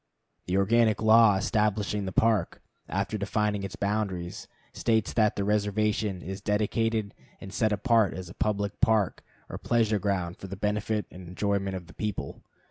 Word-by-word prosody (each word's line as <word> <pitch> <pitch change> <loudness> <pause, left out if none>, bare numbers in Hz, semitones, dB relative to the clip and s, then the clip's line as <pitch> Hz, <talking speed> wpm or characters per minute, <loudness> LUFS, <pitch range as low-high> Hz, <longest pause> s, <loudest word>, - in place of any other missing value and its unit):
The 90 +1 +1
organic 110 +2 +3
law 110 -1 +6
establishing 105 0 0
the 95 - -3
Park, 110 +1 +1 0.3
after 100 +2 -2
defining 105 0 0
its 95 -2 -5
boundaries, 100 -4 -3 0.3
states 110 -2 0
that 110 -2 +2
the 100 - -1
reservation 105 -1 0
is 95 +2 -6
"dedicated 105 +1 0 0.3
and 95 - -9
set 110 -2 +1
apart 110 0 +2
as 95 -1 -6
a 85 - -10
public 100 -1 -2
park 110 -5 +2 0.2
or - - -7
pleasure 110 -3 +1
ground 95 -3 -2
for 95 - -8
the 95 - -6
benefit 105 0 -1
and 90 -1 -11
enjoyment 100 +1 -1
of 90 -2 -6
the 90 - -15
people." 105 -3 -4
105 Hz, 160 wpm, -28 LUFS, 95-110 Hz, 0.3 s, law